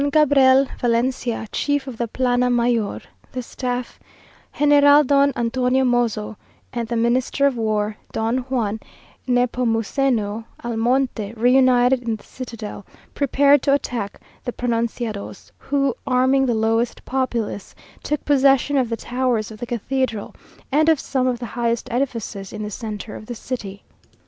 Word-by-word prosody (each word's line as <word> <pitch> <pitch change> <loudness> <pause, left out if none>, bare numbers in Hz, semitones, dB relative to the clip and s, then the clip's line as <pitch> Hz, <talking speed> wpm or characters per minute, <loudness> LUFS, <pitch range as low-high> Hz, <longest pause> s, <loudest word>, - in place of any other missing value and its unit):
Don 285 - +1
Gabriel 275 -3 +5
Valencia, 240 -1 0
chief 285 -2 0
of 260 -4 -7
the 235 - 0
plana 250 +1 +1
mayor 235 -3 +1 0.3
(the 255 -1 -4
staff), 245 0 -4 0.6
General 290 0 +6
Don 280 +1 +3
Antonio 250 +2 +1
Mozo, 235 -4 0 0.4
and 235 -1 -3
the 235 - -2
Minister 245 +4 +1
of 280 -2 +2
War, 215 -2 -1 0.2
Don 225 +3 0
Juan 220 -5 -1 0.5
Nepomuceno 235 -2 0 0.2
Almonte, 235 -2 0
re 240 +2 +3
united 255 -1 +4
in 230 -2 -2
the 215 - -14
citadel, 230 -5 -8 0.3
prepared 280 0 +4
to 275 - +2
attack 235 -7 -4 0.2
the 245 - -3
pronunciados, 230 -3 -3
who, 275 -2 0
arming 260 +1 +3
the 240 - +1
lowest 225 +2 0
populace, 240 -6 -2 0.3
took 300 - -3
possession 275 0 +3
of 255 -3 +1
the 230 - -2
towers 245 -4 -1
of 215 - -11
the 240 - -5
cathedral, 240 -1 -2 0.4
and 310 +3 +4
of 320 -3 +4
some 260 -2 -1
of 250 -1 0
the 240 - -6
highest 235 -1 -1
edifices 230 -6 -3
in 215 0 -5
the 210 - -5
centre 215 0 -6
of 215 - -10
the 240 - -5
city. 210 -4 -6
245 Hz, 145 wpm, -21 LUFS, 225-265 Hz, 0.6 s, General